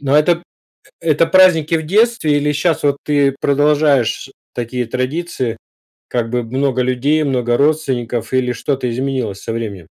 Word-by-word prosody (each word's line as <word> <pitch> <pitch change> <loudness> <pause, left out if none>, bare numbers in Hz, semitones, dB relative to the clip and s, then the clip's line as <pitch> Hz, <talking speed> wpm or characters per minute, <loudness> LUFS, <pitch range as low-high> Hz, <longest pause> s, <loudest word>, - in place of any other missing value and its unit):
Но 140 0 +1
это 170 +3 +3 0.6
это 160 0 +2
праздники 170 -4 +4
в 160 - -4
детстве 205 -5 +2
или 150 +1 +1
щас, 155 +2 0
вот, 140 -1 +2
ты 140 -2 +2
продолжаешь 145 -3 +2 0.2
такие 120 0 -3
традиции, 130 0 -3 0.5
как 115 -2 -2
бы 125 0 -1
много 130 +2 -1
людей, 130 +5 +1
много 125 -3 0
родственников 130 -6 -1
или 130 -1 +1
что-то 130 0 -2
изменилось 125 -5 -3
со - - -4
временем? 105 -7 -5
135 Hz, 145 wpm, -17 LUFS, 125-150 Hz, 0.6 s, праздники